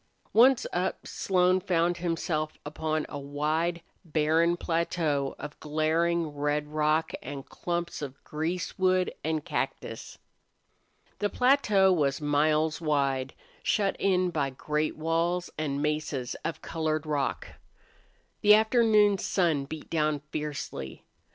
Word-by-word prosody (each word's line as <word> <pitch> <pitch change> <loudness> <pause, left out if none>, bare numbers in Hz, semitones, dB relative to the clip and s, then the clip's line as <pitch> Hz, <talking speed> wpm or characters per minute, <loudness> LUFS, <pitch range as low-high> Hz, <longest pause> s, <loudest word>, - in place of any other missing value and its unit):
Once 250 +2 +6
up, 180 +1 -1
Slone 185 -1 +2
found 175 -2 +1
himself 165 -2 -2
upon 155 +1 -2
a 145 - -6
wide, 155 +5 -1 0.2
barren 165 +1 +2
plateau 165 -5 -1
of 150 0 -8
glaring 160 +2 +1
red 145 0 -1
rock 155 +1 +1
and 135 0 -7
clumps 170 -2 -3
of 140 -2 -6
greasewood 180 +3 0
and 155 -1 -1
cactus. - - -4 1.0
The 205 - +1
plateau 210 -8 +4
was 140 -5 +1
miles 150 +2 +1
wide, 140 -4 0 0.3
shut 200 -3 +1
in 185 -2 +2
by 145 -5 0
great 150 +3 -2
walls 165 +3 0
and 145 -2 -2
mesas 150 -4 -2
of 165 - -4
colored 155 -1 -2
rock. 145 -3 -2 0.9
The 210 0 +8
afternoon 215 -3 +4
sun 165 -9 +1
beat 155 +2 -8
down 155 -3 +1
fiercely. 145 - -5
160 Hz, 115 wpm, -28 LUFS, 150-175 Hz, 1.0 s, The